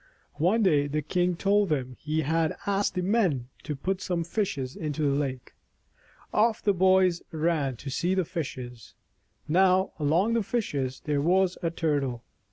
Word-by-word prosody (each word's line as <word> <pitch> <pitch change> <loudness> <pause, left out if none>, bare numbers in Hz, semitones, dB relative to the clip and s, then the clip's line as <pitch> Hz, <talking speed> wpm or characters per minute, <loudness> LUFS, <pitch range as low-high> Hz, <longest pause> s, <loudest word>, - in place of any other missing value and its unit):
One 210 +7 +3
day 150 -7 +3
the 150 +1 -2
king 180 +4 0
told 200 +2 +2
them 130 -4 -2
he 155 +1 -1
had 160 +2 0
asked 200 0 0
the 180 - -1
men 180 - +1
to 150 - -4
put 185 +7 -2
some 175 -3 -1
fishes 160 - -2
into 150 -1 -3
the 140 -1 +2
lake. 135 -3 -3 0.8
Off 220 +1 +3
the 205 - +2
boys 185 -1 +3
ran 155 -4 0
to 135 +4 -7
see 175 +7 0
the 185 -2 +1
fishes. 125 - -6 0.5
Now, 185 +3 +3
along 165 +10 +2
with 230 -3 +1
the - - -23
fishes, 140 - -2
there 145 -2 0
was 185 +3 +2
a 170 - 0
Turtle. 140 -7 -1
165 Hz, 170 wpm, -27 LUFS, 145-190 Hz, 0.8 s, One